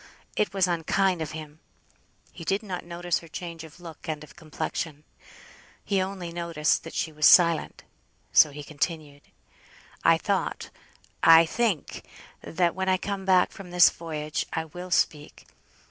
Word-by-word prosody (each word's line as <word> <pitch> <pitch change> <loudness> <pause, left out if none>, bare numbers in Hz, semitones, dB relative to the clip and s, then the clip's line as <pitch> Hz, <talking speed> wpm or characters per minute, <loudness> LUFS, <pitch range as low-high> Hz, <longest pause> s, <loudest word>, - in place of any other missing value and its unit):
It 210 - 0
was 195 -2 +2
unkind 180 +1 +1
of 155 -1 -4
him. 155 -1 -9 0.7
He - - -10
did 195 +6 -1
not 185 -4 -5
notice 175 0 -2
her 165 - -14
change 165 0 -7
of 160 +2 -13
look 165 -1 -10
and 155 -1 -4
of 155 - -15
complexion. 155 -2 -5 0.8
He 195 -2 +1
only 185 -2 -5
noticed 170 -3 0
that - - -9
she 160 - -1
was 150 0 +4
silent, 170 -3 +4 0.5
so 155 - +7
he 145 +1 -9
continued: 150 -1 -4 0.8
"I - - +5
thought - - -2 0.5
I 165 0 +8
think, 210 - -2 0.4
that 170 0 0
when 190 0 -2
I 185 - +3
come 195 +1 -4
back 185 -1 +4
from 195 -4 -11
this 180 0 +6
voyage, 155 -2 -4
I 160 - -2
will 180 +3 -9
speak. 150 -3 -1
170 Hz, 155 wpm, -26 LUFS, 155-185 Hz, 0.8 s, I